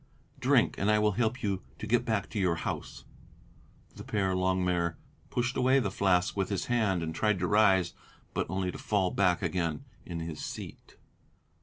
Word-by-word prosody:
"Drink. - - +3
And 100 - +1
I 105 - +5
will 105 0 +3
help 120 +4 -1
you 100 -2 -1 0.2
to - - -6
get 120 +3 +2
back 110 -3 0
to 105 - -2
your 90 -3 +2
house." - - -5 0.9
The - - -8
Père 95 -3 0
Longuemare 90 -2 +1 0.3
pushed 125 +1 -1
away 130 +1 +4
the 110 -8 +1
flask 90 -2 +2
with 95 -2 -1
his 100 -3 -1
hand 105 -8 +1
and 80 0 -3
tried 105 +4 +1
to 90 - -1
rise, 95 -3 +4 0.4
but - - -1
only 95 0 -1
to - - -9
fall 95 -4 +1
back 90 -3 +2
again 85 -5 -1 0.2
in 85 -1 -5
his 80 -2 -5
seat. - - -8
95 Hz, 180 wpm, -30 LUFS, 90-105 Hz, 0.9 s, I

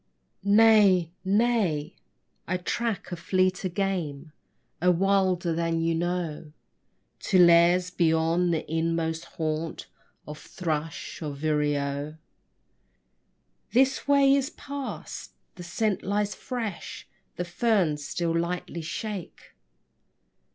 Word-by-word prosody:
Nay 200 -4 +5
nay. 200 -7 +1 0.5
I 185 - 0
track 200 +2 -3
a - - -2
fleeter 185 +2 0
game, 170 -6 -3 0.5
A 180 - +4
wilder 185 -1 +2
than 165 0 0
ye 165 0 +1
know, 165 -3 -3 0.7
To 190 - +1
lairs 175 +1 +5
beyond 165 +1 +2
the 160 - -2
inmost 165 0 -1
haunt 160 0 -4 0.4
Of 150 0 -8
thrush 160 -2 -4
or 150 -3 -4
vireo. 145 0 -1 1.6
This 265 +3 +2
way 280 -1 +5
it 275 +1 -2
passed: 280 -1 -7 0.2
the - - -11
scent 195 +4 -1
lies 205 +1 -1
fresh; 230 -8 -6 0.3
The 180 - -3
ferns 175 -5 +1
still 165 +2 -2
lightly 170 0 -2
shake. 195 +3 -6
175 Hz, 100 wpm, -26 LUFS, 160-200 Hz, 1.6 s, Nay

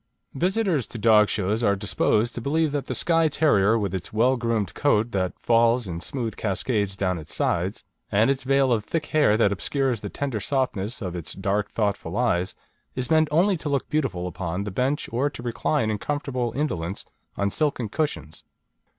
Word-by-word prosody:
Visitors 180 - 0
to - - -7
dog 105 -1 +5
shows 105 +3 0
are 100 -2 +3
disposed 105 +3 +1
to 120 - -4
believe 155 +4 +1
that 145 -1 -3
the - - -3
Skye 165 -1 +3
Terrier, 115 -9 +3
with 100 -4 -2
its 95 -2 -4
well 120 +5 +3
groomed 115 -5 -1
coat 120 -5 +2
that 95 -3 -1
falls 115 0 +3
in 85 -1 -5
smooth 115 -3 -3
cascades 100 -1 -1
down 90 -3 0
its 75 - -7
sides, - - -1 0.3
and 110 +6 +4
its 135 - -2
veil 135 -1 +3
of 110 -3 0
thick 155 +8 -2
hair 145 -10 +3
that 105 -3 +3
obscures 125 +3 -1
the 105 - -5
tender 135 -3 -3
softness 120 -4 -2
of 90 -2 -4
its 85 -3 -6
dark 100 +2 -1
and - - -33
thoughtful 100 -4 -1
eyes, 95 -7 +1 0.4
is 130 +2 -3
meant 160 -1 +4
only 180 +6 +3
to 155 -1 -5
look 140 -2 -1
beautiful 135 -13 -1
upon 90 +1 -3
the 100 - -5
bench 130 +8 -1
or 130 +5 +1
to 120 - -10
recline 120 0 0
in 105 - -2
comfortable 130 -2 -2
indolence 95 - -2 0.3
on 100 0 0
silken 140 -5 0
cushions. 105 - -3
115 Hz, 190 wpm, -25 LUFS, 100-140 Hz, 0.4 s, dog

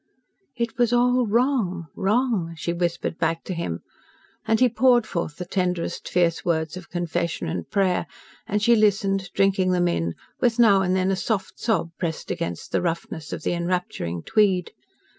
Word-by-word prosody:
"It 235 -1 -3
was 240 -1 +3
all 245 0 +3
wrong 220 -7 +1
wrong!" 205 -5 0
she 170 +2 -2
whispered 170 -1 -2
back 165 0 0
to 185 - -4
him, 125 - -3 0.7
and 220 0 +3
he 255 - +6
poured 240 0 +4
forth 170 -7 -3
the 180 - -6
tenderest, 180 -2 -2
fierce 170 -2 +1
words 160 -2 0
of 185 -2 -9
confession 170 - -2
and 80 +1 -4
prayer, 190 -3 +1 0.4
and 210 0 0
she 235 +1 +6
listened, 195 -3 +2
drinking 190 -2 +3
them 175 -1 +2
in, 85 - -1 0.2
with 240 -2 +2
now 210 -5 +6
and 185 0 +1
then 190 0 +1
a - - +2
soft 190 0 -2
sob 170 -8 0
pressed 165 -3 -3
against 85 -1 -4
the - - +1
roughness 165 -2 -3
of - - -5
the - - 0
enrapturing 170 - -2
tweed. 195 -5 +2
185 Hz, 170 wpm, -24 LUFS, 170-220 Hz, 0.7 s, he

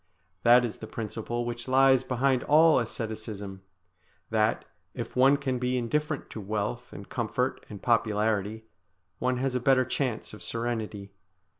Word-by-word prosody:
That 120 +1 +6
is 115 - -5
the 110 - -8
principle 115 +2 -4
which 120 +1 -5
lies 130 0 +5
behind 130 0 +1
all 155 +1 +6
asceticism, 110 -4 -5 0.7
that, - - +1 0.3
if - - -6
one 135 +3 +5
can 130 -3 -2
be 125 +1 0
indifferent 150 +5 -1
to 110 - -6
wealth 110 +4 -3
and 100 - -9
comfort 125 +2 -2
and 100 -2 -9
popularity, 110 -2 +1 0.6
one 125 +1 0
has 130 +1 -1
a 125 - +1
better 130 +1 +3
chance 125 -6 -2
of 105 - -10
serenity. 110 -4 -3
120 Hz, 145 wpm, -28 LUFS, 110-130 Hz, 0.7 s, That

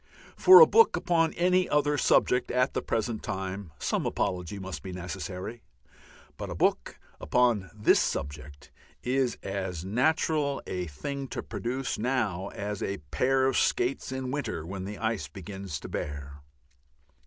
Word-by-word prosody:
For 375 +2 +9
a - - +11
book 455 0 +5
upon 165 -2 +2
any 180 +1 +2
other 150 0 +2
subject 125 -2 +3
at 125 +1 +1
the - - -1
present 115 -1 -2
time 95 -3 -5
some - - -1
apology 90 +1 -2
may 95 0 -7
be 95 - -7
necessary, 90 +4 -6 0.8
but - - -5
a - - -5
book - - 0 0.2
upon 115 -1 +2
this 105 0 +3
subject 70 0 -4 0.3
is 130 -1 0
as 95 -3 -4
natural 140 +5 +1
a 90 -1 -3
thing 140 - -5
to - - -5
produce 125 0 -3
now 110 -6 -1
as 100 0 -5
a 100 - -2
pair 130 +1 +2
of 135 -1 +1
skates 130 +2 0
in 130 -1 -3
winter 115 - -3
when 95 +2 -5
the 105 +1 -6
ice 110 -8 -2
begins 95 0 -7
to - - -7
bear. 70 0 -5
105 Hz, 150 wpm, -28 LUFS, 95-130 Hz, 0.8 s, a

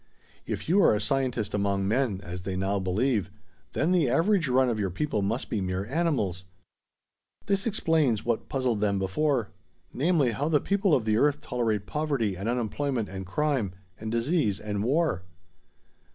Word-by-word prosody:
If - - -4
you 190 +5 +4
are 135 - +5
a - - 0
scientist 125 -3 -1
among 100 -1 0
men, 110 -3 0
as 90 +2 -6
they 95 0 -4
now 95 +2 0
believe, 100 +2 0 0.4
then 155 +5 +1
the 170 -8 +3
average 170 - +2
run 130 +1 +3
of 115 -3 -1
your 100 -2 0
people 105 - -1
must 110 +6 -1
be 105 - -2
mere 95 +1 -2
animals. 125 - -1 1.0
This 200 +1 0
explains 160 - +1
what 115 -2 +1
has - - -26
puzzled 130 -6 0
them 100 -2 +2
before; 115 +5 0 0.4
namely, 150 -3 +2
how 140 +8 -1
the 150 -2 +4
people 195 -3 +2
of 120 - -1
the 110 0 +2
earth 145 +3 +3
tolerate 110 -7 -1
poverty 140 -10 -1
and 100 +5 -3
unemployment 120 0 -1
and 95 -1 -6
crime, 130 -3 0 0.3
and 110 0 -4
disease 115 - +1
and 105 -1 -3
war." 145 - +1
120 Hz, 170 wpm, -27 LUFS, 100-150 Hz, 1.0 s, are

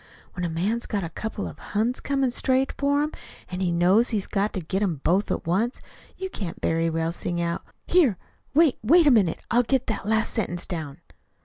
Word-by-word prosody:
When 180 - -5
a 175 - 0
man's 200 +9 -1
got 205 -4 -2
a 165 - -4
couple 215 +3 -4
of - - -10
Huns 225 +5 -1
coming 275 -2 0
straight 260 +2 +1
for 285 +1 +2
him, 305 - -2 0.4
and 180 0 -4
he 180 -2 +1
knows 185 +7 +4
he's 210 -4 0
got 205 +1 0
to - - -2
get 185 +4 -2
'em 170 -9 -1
both 190 +5 +2
at - - -2
once, 205 +9 0 0.4
you 380 - -3
can't 180 -5 -5
very 165 0 +1
well 165 0 -1
sing 175 0 -3
out: 170 0 -2 0.2
'Here, 290 - +4 0.4
wait 315 -3 +4
wait 320 +9 +5
a 290 - +7
minute 200 -9 +2
till 240 - +4
I - - +7
get 260 +1 0
that 220 -2 -3
last 220 +1 +2
sentence 175 -6 -1
down!'" 160 -3 -6
205 Hz, 215 wpm, -25 LUFS, 175-245 Hz, 0.4 s, a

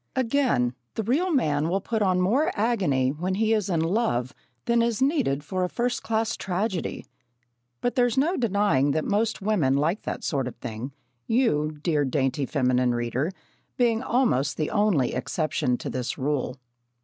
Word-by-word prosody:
Again, 250 - +1 0.2
the 220 - -1
real 300 - +1
man 155 - +1
will 190 +3 +1
put 220 +3 -2
on 185 -2 +2
more 260 - +2
agony 185 - +1
when 175 +7 -2
he 220 +2 +2
is 210 -3 0
in 170 -3 +1
love 165 - 0 0.3
than 235 -1 +3
is 230 -2 0
needed 265 - +1
for 185 +4 -2
a 180 - -1
first 245 +4 -1
class 225 0 -1
tragedy. 190 0 -3 0.8
But 245 - 0
there's 245 -1 +2
no 320 +7 +2
denying 200 - +2
that 155 - -1
most 210 0 0
women 175 -11 +2
like 160 +8 +1
that - - -5
sort 135 -4 -1
of 125 - -7
thing, 120 +2 -6 0.4
you, 155 - +1
dear 155 -4 +2
dainty 135 0 0
feminine 125 -3 +1
reader, 120 +7 -1 0.5
being 235 -2 +2
almost 235 - +1
the 155 - -1
only 205 - +2
exception 130 -1 -1
to - - -7
this 125 -1 -3
rule. 135 -2 -1
185 Hz, 165 wpm, -25 LUFS, 140-230 Hz, 0.8 s, than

